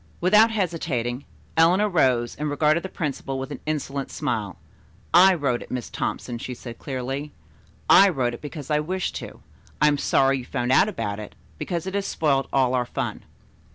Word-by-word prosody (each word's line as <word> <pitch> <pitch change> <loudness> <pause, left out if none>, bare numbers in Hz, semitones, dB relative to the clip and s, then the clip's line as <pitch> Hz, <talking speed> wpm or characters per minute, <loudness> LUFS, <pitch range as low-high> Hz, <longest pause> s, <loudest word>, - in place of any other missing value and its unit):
Without 210 +5 +5
hesitating, 150 - -2 0.3
Eleanor 180 +6 +4
rose 130 - +2
and 150 +1 -3
regarded 150 +3 +2
the 190 - -6
principal 145 -6 -4
with 135 +2 -5
an 145 - -6
insolent 140 -2 -3
smile. - - -3 0.6
"I 185 +2 +7
wrote 135 -7 -1
it, - - -10
Miss 125 -2 -5
Thompson," 120 -1 -3
she 125 +1 -6
said 120 -1 -9
clearly. 135 +2 -4 0.5
"I 200 - +8
wrote 130 -8 -1
it 120 - -9
because 150 -1 -7
I 150 - +3
wished 185 +5 -2
to. - - -9 0.4
I 150 - +5
am 145 -1 +2
sorry 135 -1 +2
you 125 - -8
found 125 -1 -2
out 165 +10 +5
about 110 - -4
it, 105 - -9 0.2
because 170 -2 -3
it 190 - -4
has 200 -1 -1
spoiled 140 -4 +1
all 130 -2 +2
our 125 -1 0
fun." - - -4
145 Hz, 185 wpm, -24 LUFS, 125-170 Hz, 0.6 s, I